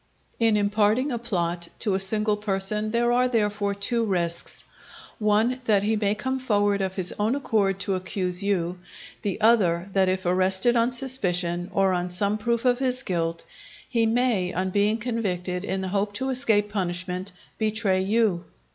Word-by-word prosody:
In 225 -2 +3
imparting 210 +6 +1
a 240 - -2
plot 175 -6 -2
to 205 - -1
a 190 - +1
single 210 +2 +2
person 210 +1 +1
there 235 +2 +1
are, 250 +1 +3
therefore, 210 -4 0
two 230 +4 -1
risks: 175 -5 -2 0.6
one, 220 +4 +1
that 205 -3 +3
he 220 +2 +1
may 210 -1 0
come 260 +5 -3
forward 205 -5 +1
of 190 0 -2
his 185 -2 -1
own 215 +5 +1
accord 205 -8 0
to 195 - -1
accuse 185 0 -1
you; 180 -3 -1 0.4
the 200 -1 -3
other, 200 -6 +3
that 190 -1 +3
if 185 0 -2
arrested 190 +6 +2
on 235 +1 +2
suspicion, 180 -9 +1
or 195 -1 +2
on 180 0 -2
some 200 +4 +2
proof 235 +2 -1
of 245 0 +3
his 255 -1 0
guilt, 165 -5 -2 0.4
he 230 -3 +1
may, 225 -6 +1
on 185 +1 -2
being 205 +3 +2
convicted, 190 -6 -3
in 190 -1 -3
the 190 - -3
hope 205 +1 -1
to 265 +5 -3
escape 220 -6 +1
punishment, 185 0 -3 0.3
betray 215 -3 +1
you. 200 -3 +1
205 Hz, 170 wpm, -25 LUFS, 185-230 Hz, 0.6 s, In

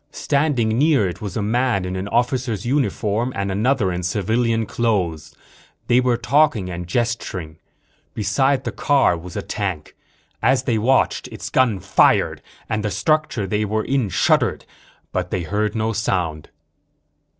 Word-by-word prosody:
Standing 130 -6 0
near 145 -9 +3
it 90 0 -6
was 100 -2 -5
a 105 - -1
man 115 -2 +1
in 90 0 -4
an 95 +2 -4
officer's 120 -1 -1
uniform 120 -3 0
and 100 0 -2
another 105 0 +1
in 90 0 -3
civilian 115 +5 0
clothes. 85 -10 -1 0.5
They 120 - +4
were 125 -2 +2
talking 130 -8 +2
and 90 0 -6
gesturing. 95 -7 -2 0.6
Beside 130 +7 +1
the - - -3
car 140 -10 +2
was 85 +1 -9
a - - -3
tank. 95 -8 -4 0.5
As 130 +4 +3
they 115 -2 0
watched, 130 +5 +2
its - - -8
gun 120 -7 +2
fired 100 +2 +2 0.3
and 105 -1 -2
the 105 - 0
structure 140 - 0
they 105 +2 -1
were 110 +1 -1
in 130 -6 0
shuddered, 85 - +1 0.5
but 90 -1 -2
they 90 -2 -2
heard 105 +5 -1
no 110 0 0
sound. 90 -8 -2
110 Hz, 150 wpm, -21 LUFS, 95-125 Hz, 0.6 s, They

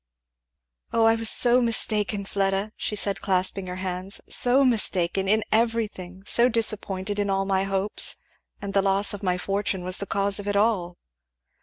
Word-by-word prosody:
"O 225 -1 +2
I 225 - +5
was 225 -1 +2
so 245 +1 +4
mistaken, 210 -3 +1
Fleda!" 195 +1 -2
she 210 - -4
said 200 -1 -2
clasping 190 0 0
her 180 - -6
hands, 185 +1 -3
"so 260 +3 +3
mistaken! 195 -6 +1
in 215 +2 +2
everything; 215 -5 -2
so 240 +3 +3
disappointed, 205 -3 -1
in 205 -1 -1
all 195 0 0
my 195 0 0
hopes. 195 +1 +1 0.4
And 200 -1 -7
the 195 - +3
loss 195 +1 +2
of 205 - -7
my 180 -2 -1
fortune 195 0 -2
was 185 +1 +1
the 200 - -6
cause 200 0 +1
of 205 - -8
it 205 - -1
all." 200 -5 0
200 Hz, 170 wpm, -24 LUFS, 190-215 Hz, 0.4 s, I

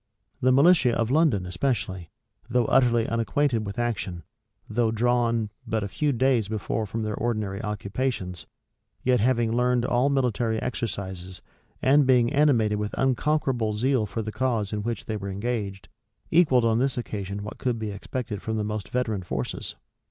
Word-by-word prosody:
The 130 0 +4
militia 140 -2 +5
of 115 +1 0
London 140 - +3
especially, 95 -4 -2 0.4
though 125 -1 +2
utterly 120 -3 +3
unacquainted 115 0 0
with 100 - -6
action, 100 -8 -2 0.4
though 115 +1 +1
drawn 115 -1 +1 0.2
hut 110 -2 0
a - - -2
few 145 +9 0
days 125 -4 +2
before 110 +1 -2
from 110 +3 -3
their 105 0 -2
ordinary 110 -3 -2
occupations, 105 -3 -3 0.6
yet 125 0 +3
having 120 0 +2
learned 125 0 +2
all 125 +3 +2
military 120 -4 +1
exercises, 95 -7 -4 0.4
and 140 +1 +5
being 125 0 +4
animated 120 -8 +3
with 105 0 -3
unconquerable 135 -4 +1
zeal 120 0 +1
for 105 +3 -4
the 110 - -4
cause 115 -5 -1
in 105 - -1
which 115 +2 -3
they 110 - -3
were 100 -1 -5
engaged, 100 -1 -3 0.4
equalled 140 -8 +4
on 115 0 +3
this 135 0 0
occasion 100 -3 -4
what 105 - -8
could 125 -2 0
be 110 -2 -4
expected 105 +1 -5
from 110 0 -2
the 105 - 0
most 105 -1 -4
veteran 110 -6 -1
forces. 65 -8 -4
115 Hz, 160 wpm, -26 LUFS, 105-125 Hz, 0.6 s, militia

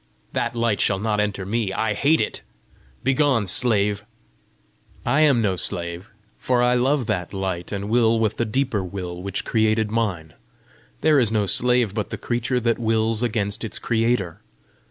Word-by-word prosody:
"That - - -1
light 115 -3 0
shall 100 - +2
not 105 +1 -1
enter 100 -2 -1
me: 105 0 -1
I 110 +2 -1
hate 145 +9 +2
it! - - -3 0.6
Begone, 135 -4 +2
slave!" 105 -1 +1 1.0
"I 135 +5 +2
am 140 -7 +4
no 95 -3 +1
slave, 85 +3 -1 0.3
for 125 -1 +1
I 125 0 +3
love 130 +2 +1
that 100 -4 -3
light, 95 -3 -3
and 100 0 -4
will 115 0 +3
with 110 -1 0
the 120 - 0
deeper 115 -2 -1
will 90 -1 -6
which 100 +1 -4
created 110 -1 +1
mine. 95 -9 -2 0.7
There 155 -2 +4
is 115 -4 +2
no 105 -2 +1
slave 125 0 +2
but 105 -2 -3
the - - -5
creature 125 +1 -1
that 115 0 0
wills 110 -1 0
against 105 -4 -1
its 110 - -4
creator. 115 -7 -1
110 Hz, 165 wpm, -22 LUFS, 100-120 Hz, 1.0 s, am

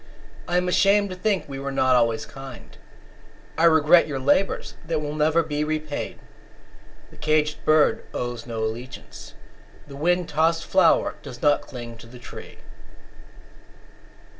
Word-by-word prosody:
I 175 - +1
am 180 0 +1
ashamed 200 +2 +3
to - - -5
think 195 +1 -1
we 135 -1 -6
were 140 0 -4
not 130 -1 +3
always 115 -2 +1
kind; 135 -3 -11 0.8
I 165 - +3
regret 160 +1 +5
your 145 -3 -3
labours, 145 +9 +1
that 165 -1 -2
will 150 0 -4
never 155 +2 +2
be 150 -1 -2
repaid. 155 -1 -4 0.9
The - - -17
caged 150 0 0
bird 155 -1 +3
owes 120 -1 -5
no 115 -2 -3
allegiance; 115 +4 -7 0.5
The 140 - -10
wind 175 +4 +1
tossed 160 +2 +1
flower 185 -4 +3
does 120 - -10
not 145 -1 +4
cling 120 -3 -9
to 115 - -13
the 125 +2 -13
tree. 120 - -11
150 Hz, 145 wpm, -24 LUFS, 130-165 Hz, 0.9 s, regret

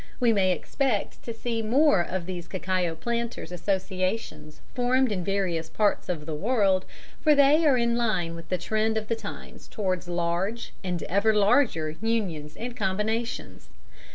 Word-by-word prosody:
We 240 -3 +4
may 190 -3 +3
expect 245 +3 -1
to 235 - -4
see 230 0 -3
more 235 - +4
of 175 0 -3
these 175 -2 -6
cacao 185 -3 -1
planters' 235 +4 -3
associations 185 -3 -2
formed 250 0 +2
in 185 -3 -1
various 180 -4 -1
parts 210 0 +1
of 160 -4 -3
the 160 - -4
world, 195 +1 +2 0.4
for 305 -2 +5
they 290 +3 +5
are 270 -3 +5
in 235 -1 +2
line 190 -8 0
with 165 -1 -10
the 185 - +1
trend 220 +5 0
of 215 -1 -3
the 230 - +2
times - - -9
towards 185 -4 -2
large, 175 +6 -2
and 180 -2 -2
ever 205 +4 +2
larger, 200 - +3
unions 180 -10 -2
and 240 +1 -5
combinations. 220 +3 -2
200 Hz, 155 wpm, -27 LUFS, 180-230 Hz, 0.4 s, for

